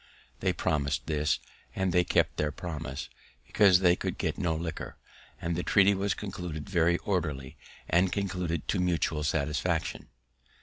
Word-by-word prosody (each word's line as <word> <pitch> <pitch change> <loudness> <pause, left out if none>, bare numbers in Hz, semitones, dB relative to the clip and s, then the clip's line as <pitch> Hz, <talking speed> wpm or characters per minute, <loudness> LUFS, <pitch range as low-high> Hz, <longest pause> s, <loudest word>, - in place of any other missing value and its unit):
They - - +1
promis'd 70 -2 -1
this, 75 -1 +1 0.4
and 95 -2 0
they 90 - +5
kept - - +1
their 75 -1 0
promise, 75 -4 -5 0.4
because 95 -3 +5
they 90 -2 +5
could - - -3
get - - -1
no 80 -2 +1
liquor, 80 0 -5 0.4
and 85 0 -2
the 90 - -1
treaty 100 +2 +5
was 100 -1 0
conducted 90 -6 -5
very 85 -3 +3
orderly, 75 -8 -2 0.3
and 90 +2 +3
concluded 90 -5 -2
to 100 - +1
mutual 85 -3 +1
satisfaction. 75 -2 -1
85 Hz, 145 wpm, -29 LUFS, 75-90 Hz, 0.4 s, they